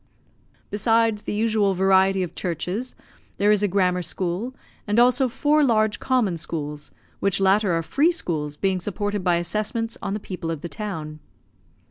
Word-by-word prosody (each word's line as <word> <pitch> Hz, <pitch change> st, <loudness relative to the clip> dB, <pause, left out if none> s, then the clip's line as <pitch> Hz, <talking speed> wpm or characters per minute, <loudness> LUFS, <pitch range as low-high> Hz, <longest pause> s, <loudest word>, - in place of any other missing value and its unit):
Besides 225 Hz, 0 st, +2 dB
the -, -, -4 dB
usual 215 Hz, -3 st, +2 dB
variety 190 Hz, 0 st, +3 dB
of 175 Hz, -1 st, -6 dB
churches, 185 Hz, -, -3 dB, 0.4 s
there 205 Hz, +1 st, +3 dB
is 210 Hz, -1 st, +3 dB
a 205 Hz, -, +3 dB
grammar 180 Hz, -2 st, +1 dB
school, 185 Hz, +8 st, -3 dB, 0.3 s
and 210 Hz, +2 st, 0 dB
also 250 Hz, +2 st, +4 dB
four 295 Hz, +5 st, +2 dB
large 215 Hz, -4 st, +2 dB
common 235 Hz, -9 st, +1 dB
schools, 150 Hz, -2 st, -5 dB, 0.3 s
which 195 Hz, 0 st, +1 dB
latter 195 Hz, 0 st, +3 dB
are 165 Hz, -, -2 dB
free 290 Hz, -, +2 dB
schools, 150 Hz, -, -3 dB
being 190 Hz, +1 st, 0 dB
supported 205 Hz, +1 st, -3 dB
by 175 Hz, -2 st, +3 dB
assessments 215 Hz, +6 st, -2 dB
on 200 Hz, -, -2 dB
the -, -, -3 dB
people 185 Hz, -4 st, -6 dB
of 160 Hz, -3 st, -3 dB
the 170 Hz, -, -6 dB
town. 160 Hz, -8 st, -5 dB
195 Hz, 160 wpm, -23 LUFS, 175-220 Hz, 0.4 s, also